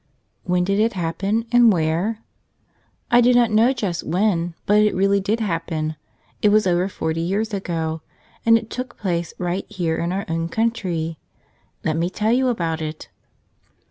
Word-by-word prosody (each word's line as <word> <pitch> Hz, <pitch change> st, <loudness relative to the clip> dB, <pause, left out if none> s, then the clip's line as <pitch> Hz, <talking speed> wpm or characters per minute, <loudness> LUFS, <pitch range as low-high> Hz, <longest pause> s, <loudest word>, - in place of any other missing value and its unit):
HEN 180 Hz, 0 st, +2 dB
did 200 Hz, +2 st, 0 dB
it 225 Hz, +2 st, +2 dB
happen, 195 Hz, +6 st, -1 dB
and 240 Hz, -2 st, +6 dB
where? 180 Hz, +6 st, 0 dB, 0.9 s
I 240 Hz, 0 st, +6 dB
do 245 Hz, +1 st, +4 dB
not 240 Hz, -2 st, +4 dB
know 225 Hz, +4 st, +4 dB
just 205 Hz, -10 st, -2 dB
when, 175 Hz, -1 st, 0 dB
but 210 Hz, +1 st, +4 dB
it 210 Hz, -2 st, +2 dB
really 195 Hz, +1 st, +3 dB
did 205 Hz, +4 st, -1 dB
happen. 165 Hz, -5 st, -2 dB, 0.5 s
It 210 Hz, -, +5 dB
was 215 Hz, 0 st, +4 dB
over 180 Hz, +1 st, +1 dB
forty 160 Hz, -3 st, -2 dB
years 205 Hz, +6 st, -1 dB
ago, 165 Hz, -4 st, -3 dB, 0.4 s
and 230 Hz, 0 st, +6 dB
it 225 Hz, -1 st, -7 dB
took 255 Hz, -1 st, -5 dB
place 175 Hz, -4 st, -2 dB
right 180 Hz, +2 st, -2 dB
here 175 Hz, -6 st, -1 dB
in 170 Hz, +1 st, -1 dB
our 195 Hz, +2 st, -2 dB
own 165 Hz, 0 st, -2 dB
country. 175 Hz, -8 st, -1 dB, 0.6 s
Let 155 Hz, 0 st, 0 dB
me 170 Hz, +2 st, 0 dB
tell 215 Hz, +4 st, 0 dB
you 255 Hz, +2 st, +3 dB
about 165 Hz, -9 st, -1 dB
it. 155 Hz, 0 st, -6 dB
190 Hz, 170 wpm, -22 LUFS, 165-220 Hz, 0.9 s, and